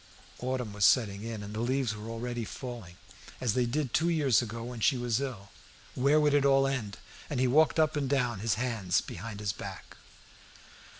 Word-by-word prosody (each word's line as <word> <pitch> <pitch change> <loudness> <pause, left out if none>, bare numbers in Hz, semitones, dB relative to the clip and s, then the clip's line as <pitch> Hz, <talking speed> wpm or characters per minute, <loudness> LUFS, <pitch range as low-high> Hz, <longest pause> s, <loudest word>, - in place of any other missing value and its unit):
Autumn 125 -4 -3
was 105 0 -2
setting 100 -4 +4
in, 110 -2 -5
and 100 +1 -7
the 110 - -4
leaves 125 -1 0
were 105 +1 -8
already 120 +1 -4
falling, 115 -7 -8 0.4
as 120 -4 0
they 125 0 +1
did 135 0 -2
two 165 +3 +3
years 140 -9 +3
ago 115 0 -5
when 120 0 -6
she 130 +5 +3
was 120 0 0
ill. 115 -8 -6 0.4
Where 140 +4 +3
would 150 -1 +3
it 145 -1 +4
all 135 0 +4
end? 130 -7 -2 0.3
And 140 - -2
he 130 - +3
walked 155 +6 +4
up 155 0 +3
and 140 -3 -1
down, 125 -6 +1
his 105 -1 +1
hands 110 -6 0
behind 105 +3 -7
his 105 -1 -1
back. - - -9
120 Hz, 195 wpm, -30 LUFS, 110-135 Hz, 0.4 s, setting